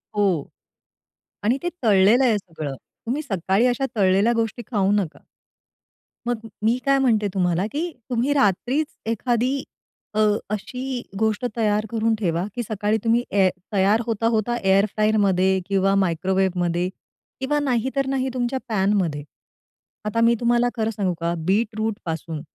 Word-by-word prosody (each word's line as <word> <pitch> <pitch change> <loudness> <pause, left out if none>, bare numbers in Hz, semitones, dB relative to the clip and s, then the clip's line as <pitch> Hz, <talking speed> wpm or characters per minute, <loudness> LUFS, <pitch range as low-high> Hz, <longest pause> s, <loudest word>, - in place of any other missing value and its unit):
हो 190 -8 +2 1.0
आणि 235 +5 +2
ते 350 - 0
तळलेलं 210 +3 +5
आहे 235 -5 +3
सगळं. 160 -7 -6 0.3
तुम्ही 255 +6 -1
सकाळी 195 - +1
अशा 250 +2 0
तळलेल्या 200 +3 +3
गोष्टी 230 0 -1
खाऊ 200 -3 +2
नका. 200 -6 -1 1.1
मग 240 -2 0 0.2
मी 230 +3 +3
काय 275 0 +4
म्हणते 225 -6 +2
तुम्हाला, 180 -1 +1
की 335 +4 -2 0.2
तुम्ही 250 +3 +1
रात्रीच 270 - +1 0.2
एखादी 245 +4 0 0.5
अ, 215 - -1 0.3
अशी 250 +5 -4 0.2
गोष्ट 220 +2 0
तयार 210 -1 +1
करून 225 0 +1
ठेवा, 170 -4 0
की 240 - -2
सकाळी 210 0 0
तुम्ही 230 +1 +2
ए 195 -2 +4 0.2
तयार 200 +3 +3
होता-होता 230 0 0
एअर 195 +1 +4
फ्रायरमध्ये 195 -3 +2
किंवा 195 -1 +2
मायक्रोवेव्हमध्ये 180 -1 +1 0.5
किंवा 280 +3 0
नाहीतर 265 0 0
नाही 265 -1 0
तुमच्या 255 +1 -1
पॅनमध्ये. 190 -8 +1 0.8
आता 215 +2 0
मी 230 +1 +5
तुम्हाला 240 0 +2
खरं 220 -2 0
सांगू 200 -4 -1
का, 170 0 -1
बीटरूटपासून 205 -6 -2
215 Hz, 135 wpm, -23 LUFS, 190-240 Hz, 1.1 s, तळलेलं